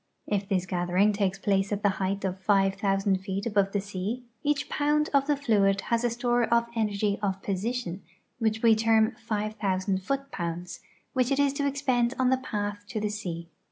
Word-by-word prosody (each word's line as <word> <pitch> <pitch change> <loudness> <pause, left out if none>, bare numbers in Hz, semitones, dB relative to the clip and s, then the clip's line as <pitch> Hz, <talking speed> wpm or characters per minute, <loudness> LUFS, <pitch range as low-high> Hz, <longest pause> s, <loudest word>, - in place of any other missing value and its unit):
If 200 -1 -2
this 185 -2 +1
gathering 180 +3 +2
takes 195 -1 -1
]»lace 195 0 +2
at 205 +1 -2
the 205 - +5
height 195 +1 -1
of 190 0 -2
five 195 0 +3
thousand 195 -1 +1
feet 190 +1 -4
above 200 -4 +2
the 205 - 0
sea, 200 +5 -4 0.2
each 290 -1 0
pound 300 +1 +1
of 275 0 +3
the 295 -1 +2
fluid 205 -7 +2
has 235 +3 0
a 240 - +3
store 240 0 +1
of 235 0 +2
energy 210 -2 0
of 195 -2 -2
position, 200 -1 -2 0.4
which 220 -1 0
we 230 -1 +7
term 220 0 +3
five 215 -1 -3
tliousand 190 -1 0
foot 275 +6 -3
pounds, 175 0 -4 0.3
which 255 -3 +2
it 275 - +2
is 285 -1 +3
to 280 0 0
expend 260 -3 +1
on 260 0 +3
its 260 - 0
path 205 -2 -3
to 215 - -3
the 210 0 -1
sea. 175 -5 -5
210 Hz, 195 wpm, -27 LUFS, 195-240 Hz, 0.4 s, we